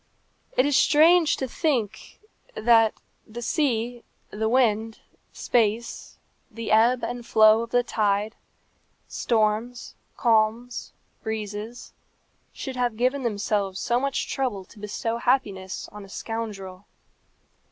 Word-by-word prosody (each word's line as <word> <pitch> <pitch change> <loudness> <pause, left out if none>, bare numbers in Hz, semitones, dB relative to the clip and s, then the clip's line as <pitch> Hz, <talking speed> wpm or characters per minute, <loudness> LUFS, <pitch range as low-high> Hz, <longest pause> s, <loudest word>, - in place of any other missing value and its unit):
It 255 - +5
is 290 -1 +1
strange 315 +4 +5
to 265 - -3
think 250 - -2 0.4
that 225 -1 +4 0.3
the 240 +2 -7
sea, 240 -4 -1 0.3
the 220 +1 -1
wind, 225 -3 +1 0.3
space, 230 0 -1 0.3
the 230 -2 -6
ebb 235 +3 +4
and 240 +1 -4
flow 220 -1 +5
of 230 - -5
the 245 +1 +2
tide, 210 -1 0 0.7
storms, 225 +1 -1 0.2
calms, 230 +1 +1 0.3
breezes, 220 +1 -6 0.6
should 260 -1 -7
have 240 -3 -1
given 255 +4 +1
themselves 205 -4 -1
so 240 +1 +1
much 275 +1 -2
trouble 235 -8 -2
to 210 - -17
bestow 220 +2 -3
happiness 200 -7 -1
on 210 -1 -10
a 195 - -13
scoundrel. 205 -4 -6
230 Hz, 115 wpm, -25 LUFS, 215-245 Hz, 0.7 s, It